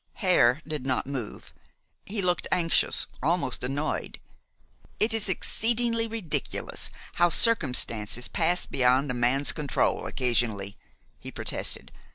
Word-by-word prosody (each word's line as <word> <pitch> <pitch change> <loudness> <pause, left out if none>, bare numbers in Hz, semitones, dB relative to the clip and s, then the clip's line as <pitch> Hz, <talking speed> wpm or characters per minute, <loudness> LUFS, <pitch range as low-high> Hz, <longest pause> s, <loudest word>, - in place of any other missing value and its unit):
Hare 155 - +3
did 150 -4 -4
not 130 -1 -1
move. 130 -5 -6 0.5
He 205 -1 -3
looked 180 -1 0
anxious, 170 -2 +2 0.2
almost 160 -3 0
annoyed. 140 +4 -3 0.8
"It 220 +2 +2
is 220 -3 +2
exceedingly 230 +3 +2
ridiculous 220 -8 -3 0.3
how 175 0 +4
circumstances 125 - +2
pass 175 +1 0
beyond 130 +2 +2
a - - -2
man's 125 +4 +2
control 150 -3 -1
occasionally," 115 -6 -1 0.4
he - - -8
protested. - - -3
150 Hz, 115 wpm, -27 LUFS, 125-185 Hz, 0.8 s, how